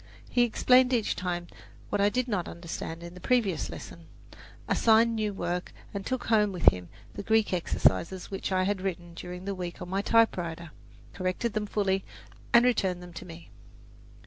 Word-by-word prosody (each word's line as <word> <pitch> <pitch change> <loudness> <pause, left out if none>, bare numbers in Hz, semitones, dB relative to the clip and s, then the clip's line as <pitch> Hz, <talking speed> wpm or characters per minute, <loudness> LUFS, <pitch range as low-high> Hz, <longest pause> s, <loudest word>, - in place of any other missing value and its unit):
He 245 - +2
explained 250 +2 +4
each 230 -4 +1
time 175 -1 -3 0.4
what - - 0
I 200 - +5
did 250 +3 -1
not 195 -7 -1
understand 170 -1 -6
in 170 0 -8
the 180 - -11
previous 200 -6 +1
lesson, 165 -1 -10 0.6
assigned 230 0 +4
new 215 -1 0
work, 180 -2 -3 0.2
and 200 -1 -4
took 255 +3 -2
home 210 -2 +3
with 180 -2 +5
him 90 -1 -8 0.2
the - - -5
Greek 220 -1 +2
exercises 180 +1 +1
which 195 0 -3
I 185 0 +2
had 195 0 0
written 175 -3 -4
during 180 +2 -8
the 200 - -2
week 180 -2 -6
on 180 - -7
my 195 +1 0
typewriter, 170 -8 +1 0.4
corrected 185 +5 -2
them 215 -1 -2
fully, 195 -2 0 0.5
and 235 +1 +6
returned 190 -7 +1
them 175 -1 -11
to 170 - -8
me. 165 0 -12
190 Hz, 175 wpm, -28 LUFS, 175-220 Hz, 0.6 s, and